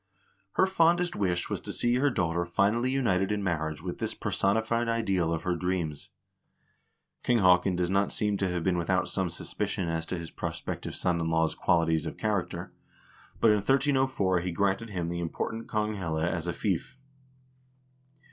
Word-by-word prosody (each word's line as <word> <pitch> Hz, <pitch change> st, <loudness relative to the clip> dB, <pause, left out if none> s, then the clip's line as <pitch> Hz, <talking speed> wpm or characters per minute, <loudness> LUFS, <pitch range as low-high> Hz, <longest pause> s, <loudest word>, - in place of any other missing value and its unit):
Her -, -, +4 dB
fondest 175 Hz, -1 st, +2 dB
wish 90 Hz, -3 st, 0 dB
was -, -, -3 dB
to -, -, -5 dB
see 120 Hz, +1 st, +1 dB
her 145 Hz, +3 st, +3 dB
daughter 85 Hz, -7 st, 0 dB
finally 100 Hz, +8 st, +1 dB
united 105 Hz, -8 st, +1 dB
in 105 Hz, -1 st, -1 dB
marriage 80 Hz, -4 st, -2 dB
with -, -, -5 dB
this -, -, -2 dB
personified 110 Hz, +4 st, 0 dB
ideal 95 Hz, -7 st, +1 dB
of 80 Hz, -, -2 dB
her 90 Hz, -1 st, 0 dB
dreams. 85 Hz, -4 st, -2 dB, 1.1 s
King 120 Hz, -, +2 dB
Haakon 90 Hz, -2 st, +4 dB
does 90 Hz, 0 st, 0 dB
not 100 Hz, +1 st, +2 dB
seem 105 Hz, -1 st, 0 dB
to 95 Hz, -1 st, 0 dB
have 90 Hz, -2 st, -2 dB
been 90 Hz, -1 st, +1 dB
without 90 Hz, +1 st, +1 dB
some 95 Hz, -2 st, -1 dB
suspicion 85 Hz, +1 st, -3 dB
as 80 Hz, 0 st, -2 dB
to 90 Hz, -, -3 dB
his 85 Hz, -1 st, -7 dB
prospective -, -, -5 dB
son 85 Hz, -2 st, 0 dB
in 80 Hz, -, -1 dB
law's 80 Hz, -1 st, +2 dB
qualities 80 Hz, -2 st, +2 dB
of -, -, -6 dB
character, 90 Hz, -5 st, -2 dB, 0.7 s
but 115 Hz, -, +5 dB
in 105 Hz, -, +4 dB
1304 130 Hz, -5 st, +2 dB
he 90 Hz, +1 st, -3 dB
granted 100 Hz, +5 st, 0 dB
him 90 Hz, -5 st, -3 dB
the 85 Hz, 0 st, -3 dB
important 110 Hz, +7 st, -3 dB
Konghelle 105 Hz, -7 st, -1 dB
as 85 Hz, 0 st, -2 dB
a 85 Hz, -, -1 dB
fief. 100 Hz, +7 st, -2 dB
95 Hz, 170 wpm, -28 LUFS, 85-110 Hz, 1.1 s, but